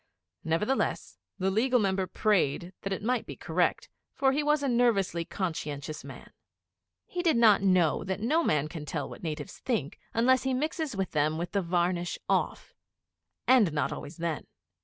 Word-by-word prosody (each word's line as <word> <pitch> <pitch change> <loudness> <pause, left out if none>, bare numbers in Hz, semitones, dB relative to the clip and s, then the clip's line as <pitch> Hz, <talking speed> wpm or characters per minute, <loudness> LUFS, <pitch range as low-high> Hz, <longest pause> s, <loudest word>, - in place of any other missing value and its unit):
Nevertheless, 190 +12 -1 0.2
the 190 0 0
Legal 250 +5 +3
Member 190 -2 0
prayed 180 -5 +1
that 195 - -4
it 195 - -3
might 245 +1 0
be - - -6
correct, - - 0 0.3
for 270 -1 +3
he 285 +3 +1
was 295 0 +2
a - - +1
nervously 230 -9 +2
conscientious 155 -5 -4
man. - - -11 0.7
He 360 - -3
did 330 -7 +3
not 220 -4 +6
know 185 -5 +3
that 190 0 -2
no 305 +10 +2
man 150 - +1
can 155 -1 -7
tell 150 -2 -3
what - - -10
natives 160 +3 -5
think 195 - -2
unless 255 +3 +3
he 265 -1 0
mixes 310 -1 -2
with 190 -1 -2
them 155 +1 +1
with 170 +1 -4
the 200 - +1
varnish 175 0 0
off. - - -1 0.7
And 240 -9 +5
not 150 - 0
always 150 - -8
then. 165 -2 -3
195 Hz, 170 wpm, -29 LUFS, 165-245 Hz, 0.7 s, not